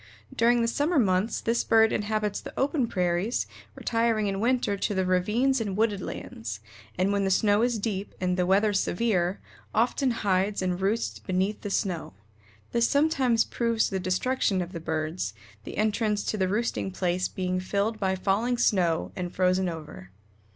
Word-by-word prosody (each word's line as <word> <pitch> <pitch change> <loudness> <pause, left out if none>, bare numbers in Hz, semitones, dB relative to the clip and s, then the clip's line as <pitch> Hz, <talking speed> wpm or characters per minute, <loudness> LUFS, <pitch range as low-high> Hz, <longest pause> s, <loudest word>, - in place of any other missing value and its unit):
During 235 +1 +3
the - - +1
summer 295 +8 +1
months 200 -2 +2
this 230 +1 +1
bird 225 -1 +4
inhabits 210 -1 -1
the - - -8
open 270 -2 +1
prairies, 180 +3 0 0.3
retiring 230 -2 +1
in 195 -1 -1
winter 240 -2 +1
to 200 +1 -2
the 190 0 +1
ravines 215 +9 +2
and 200 -3 -3
wooded 210 -3 +1
lands, 110 -9 -6 0.4
and 185 +2 +2
when 200 -1 +1
the 195 - +1
snow 205 +2 +3
is 240 -1 +1
deep 200 -2 -3
and 180 -1 0
the 180 -1 0
weather 205 +3 +3
severe 195 -2 0 0.4
often 245 +4 +2
hides 200 -3 0
and 180 0 -1
roosts 210 +4 -1
beneath 190 +3 -1
the 205 - -4
snow. 180 - -2 0.6
This 235 0 +3
sometimes 270 -6 +2
proves 230 -2 0
the 190 - -1
destruction 190 +2 0
of 175 0 -3
the 170 - -5
birds, 155 - -3 0.3
the - - -7
entrance 215 -1 +1
to - - -2
the 190 -2 +1
roosting 215 -1 -1
place 180 -1 -1
being 185 -1 -2
filled 200 +4 -1
by 190 -1 +1
falling 210 +6 0
snow 180 -8 +1
and 180 -1 -4
frozen 185 0 +1
over. 155 - -8
200 Hz, 170 wpm, -27 LUFS, 185-230 Hz, 0.6 s, bird